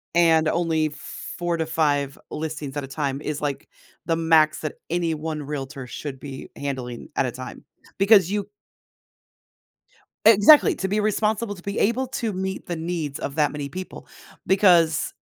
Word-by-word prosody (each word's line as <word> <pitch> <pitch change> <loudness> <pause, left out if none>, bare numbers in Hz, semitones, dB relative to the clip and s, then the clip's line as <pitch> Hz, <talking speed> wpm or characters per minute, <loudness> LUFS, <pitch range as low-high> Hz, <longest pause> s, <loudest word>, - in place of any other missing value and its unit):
and 160 -2 +4
only 160 -2 +1
4 170 +3 -5
to 160 - -1
5 145 -3 0
listings 150 -3 -5
at 145 - -2
a - - -6
time 140 0 -3
is, 150 -1 -4
like, 145 0 -3 0.4
the 165 - +1
max 160 -2 +3
that 155 - -4
any 170 -1 0
1 155 -1 -4
realtor 135 -2 -5
should 135 +2 -7
be 135 -1 -8
handling 130 -4 -5
at - - +2
a - - -3
time, - - -9 0.3
because 195 -2 +5
you 205 -1 -2 1.8
Exactly, 225 +7 +7
to 190 - -2
be 210 +2 +1
responsible, 215 0 0
to 175 - -13
be 200 0 -4
able 245 +5 +1
to 230 -4 -2
meet 190 0 -4
the 175 - -3
needs 160 -3 -3
of 140 - -4
that 150 -2 +2
many 145 -1 -5
people 185 +6 -8 0.4
because 175 -5 +4
160 Hz, 160 wpm, -24 LUFS, 145-190 Hz, 1.8 s, Exactly